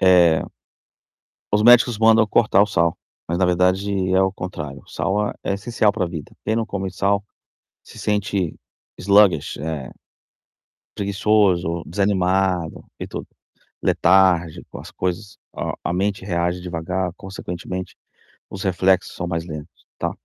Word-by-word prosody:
Eh 90 -4 +5 1.1
os 105 +1 +3
médicos 120 -1 +6
mandam 110 0 +5
cortar 105 -3 +4
o 105 - +5
sal, 85 -4 +1 0.3
mas, 85 +1 -1
na 95 - +3
verdade, 95 +2 +1
é 95 - +4
o 95 0 +2
contrário, 75 -7 -7
o - - -21
sal 105 +1 -1
é - - -6
é 100 - -1
essencial 105 +1 +1
para 90 - -1
vida, 80 -4 -7
quem 110 - 0
não 115 -1 0
come 95 -2 -4
sal, 100 +2 0 0.6
se - - -15
sente 100 -4 -1 0.4
sluggish, 100 -6 +4
eh, 75 -3 -5 1.0
preguiçoso, 100 -4 +1
desanimado, 95 -2 0 0.2
e - - -5
tudo, - - -7 0.5
letárgico 90 -3 +2
às - - -11
coisas, 95 +3 -4 0.2
a - - -3
a 85 - -1
mente 100 +1 -1
reage 90 -1 -1
devagar, 90 +1 -3
consequentemente, 95 -1 -6 0.5
os 95 - -6
reflexos 95 0 +1
são 90 - -4
mais 85 -1 -3
lentos, 75 0 -10
tá. - - -2
95 Hz, 140 wpm, -21 LUFS, 85-100 Hz, 1.1 s, médicos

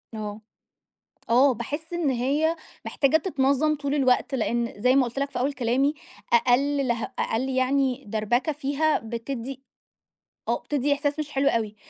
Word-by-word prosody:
آه، 210 0 -5 0.9
آه، 255 +2 +5
باحس 295 +9 -6
إن 335 -5 0
هي 285 +7 +1 0.3
محتاجة 275 +2 +2
تتنظّم 300 -2 +1
طول 280 0 -2
الوقت، 265 -1 +2
لإن 235 0 -1
زي 255 +3 +4
ما 265 - +5
قُلت 240 +3 -5
لك 280 0 -1
في 250 - -4
أول 275 +3 0
كلامي 260 +4 +1 0.4
أقل 265 +3 +3
لها 235 -1 -2
أقل 250 +4 -1
يعني 265 0 +1
دَربَكة 225 +8 0
فيها 295 +2 0
بتدّي 235 +3 -6 0.9
آه، - - +1
بتدّي 290 0 0
إحساس 290 +1 -2
مش 300 -1 -4
حلو 275 +1 +1
أوي، 220 -4 -1
270 Hz, 150 wpm, -25 LUFS, 240-285 Hz, 0.9 s, آه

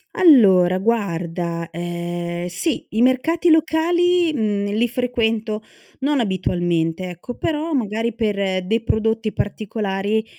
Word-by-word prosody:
Allora, 190 - +6
guarda, 170 -5 -2
ehm, 175 +1 -4
sì, 235 - -2
i 220 - -1
mercati 325 +7 +2
locali, 335 +2 +2
mhmm, 205 -5 -1
li 230 +3 +2
frequento 225 -3 -1 0.4
non 280 0 +1
abitualmente, 175 -3 -1
ecco. 180 +8 -8
Però, 315 +1 -2
magari, 225 -2 -1
per 200 -5 -1
dei 225 +5 0
prodotti 225 -1 0
particolari, 210 0 -2
215 Hz, 110 wpm, -21 LUFS, 180-250 Hz, 0.4 s, Allora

